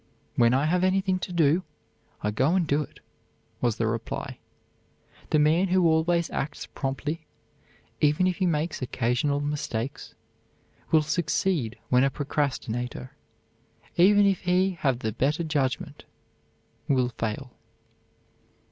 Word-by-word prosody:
"When 120 -1 +4
I 135 +3 +2
have 180 +3 +1
anything 185 0 +2
to 180 - -5
do, 165 0 +3 0.6
I 105 - +1
go 135 - +2
and 185 -3 +2
do 145 0 +1
it," - - -10 0.6
was 120 -3 +1
the 115 - 0
reply. 115 0 -4 0.9
The - - +3
man 155 +5 +3
who 185 -1 +3
always 165 +1 +2
acts 145 - -3
promptly, 150 +4 -4 0.7
even 150 +4 +3
if 185 -1 0
he 185 - +1
makes 160 -1 -1
occasional 130 +3 0
mistakes, 145 -4 -4 0.7
will 155 -1 +4
succeed 155 - 0
when 125 0 +4
a 135 - +4
procrastinator, 130 -4 -3 0.8
even 205 +3 +6
if 195 -2 +2
he 185 +1 +2
have 140 -8 0
the 110 -3 -3
better 145 +9 0
judgment, 145 -2 -2 0.8
will 130 -3 +2
fail. 115 +4 -3
150 Hz, 130 wpm, -26 LUFS, 130-175 Hz, 0.9 s, even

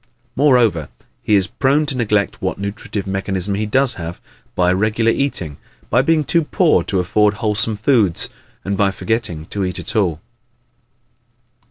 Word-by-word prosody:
Moreover, 120 - +3 0.3
he 105 - +2
is 95 -2 +3
prone 140 +8 +1
to 145 -2 -3
neglect 105 -4 0
what - - -2
nutritive 100 0 -5
mechanism 95 0 -2
he 105 +2 -1
does 130 +4 +2
have, 85 +1 -6 0.4
by 90 0 +3
irregular 110 +4 +2
eating, 95 - -2 0.3
by 125 - +4
being 155 +2 +2
too 170 +3 +2
poor 170 +1 +2
to 95 - 0
afford 105 +3 +2
wholesome 105 0 -1
foods, 110 -6 +2 0.4
and 100 0 -1
by 100 0 +2
forgetting 105 -6 -2
to 100 - -2
eat 90 -1 -2
at - - -4
all. 90 -8 +1
105 Hz, 155 wpm, -19 LUFS, 95-125 Hz, 0.4 s, by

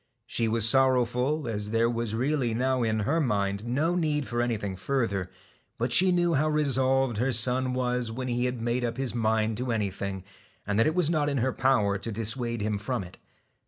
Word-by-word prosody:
She 115 - -1
was 115 0 +3
sorrowful, 130 +3 +2
as 105 -2 -3
there 115 +1 +2
was 115 -2 -2
really 130 -1 0
now 130 +1 0
in 110 -2 0
her 160 +11 +1
mind 100 -4 -1
no 150 +8 0
need 150 -6 0
for 120 +2 -1
anything 105 -5 -2
further; 100 -4 -2 0.5
but 120 +1 -1
she 185 0 +5
knew 175 -1 +2
how 155 +2 +2
resolved 135 -4 +1
her 125 +4 +1
son 125 +2 +2
was 125 -2 -1
when 125 +3 -5
he 120 0 0
had 125 -2 -3
made 120 +1 -1
up 120 0 -2
his 135 -2 -2
mind 110 -2 0
to 125 0 -2
anything, 100 -3 -3 0.4
and 100 +1 0
that 115 - +4
it 155 - 0
was 175 -3 +2
not 150 -3 +1
in 140 - -1
her 130 +1 0
power 105 -7 +1
to 115 - -5
dissuade 115 +2 -1
him 105 -1 -1
from 115 0 -3
it. 90 +1 -13
120 Hz, 200 wpm, -27 LUFS, 110-135 Hz, 0.5 s, she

